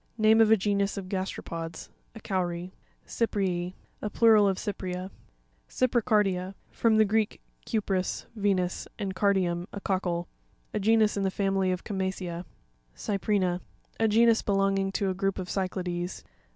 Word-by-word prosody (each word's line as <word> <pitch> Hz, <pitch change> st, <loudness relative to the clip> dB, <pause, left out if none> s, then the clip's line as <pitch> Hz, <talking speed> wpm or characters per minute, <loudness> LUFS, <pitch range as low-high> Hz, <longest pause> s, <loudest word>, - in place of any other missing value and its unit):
Name 220 Hz, 0 st, +5 dB
of 220 Hz, -, +5 dB
a 220 Hz, -, +6 dB
genus 200 Hz, 0 st, 0 dB
of 190 Hz, -2 st, -5 dB
gas 190 Hz, 0 st, -1 dB
teropods. 165 Hz, -1 st, -6 dB, 0.3 s
<A -, -, -8 dB
cowry. 180 Hz, -3 st, -2 dB, 0.3 s
Cyrrz'«.—Plural 205 Hz, +2 st, +1 dB
of 190 Hz, -1 st, +1 dB
Cyprea. 185 Hz, -2 st, -4 dB, 0.6 s
Cypricar 240 Hz, -4 st, +2 dB
p1a.—F'rom 195 Hz, +4 st, -1 dB
the 220 Hz, -, +6 dB
Greek, 215 Hz, +1 st, 0 dB, 0.3 s
ku 220 Hz, -, +2 dB
pris, 190 Hz, -2 st, -2 dB
Venus, 195 Hz, -4 st, 0 dB
and 195 Hz, -3 st, -3 dB
cardium, 185 Hz, -3 st, +1 dB
a 200 Hz, -, -6 dB
cockle. 180 Hz, -3 st, -1 dB, 0.5 s
A 210 Hz, -, 0 dB
genus 215 Hz, 0 st, +3 dB
of 200 Hz, -, 0 dB
the 190 Hz, -, +2 dB
family 195 Hz, -1 st, +1 dB
of 180 Hz, -, -3 dB
Chama 190 Hz, -2 st, -1 dB
cea. 175 Hz, -2 st, -5 dB, 0.5 s
Cypri'na.— 195 Hz, -3 st, 0 dB, 0.4 s
A 225 Hz, -, +4 dB
genus 230 Hz, +1 st, +5 dB
belonging 195 Hz, -1 st, +1 dB
to 195 Hz, -1 st, 0 dB
a -, -, -1 dB
group 195 Hz, +1 st, -1 dB
of 185 Hz, -2 st, -4 dB
Cy'clades. 180 Hz, -2 st, -3 dB
195 Hz, 145 wpm, -28 LUFS, 185-210 Hz, 0.6 s, a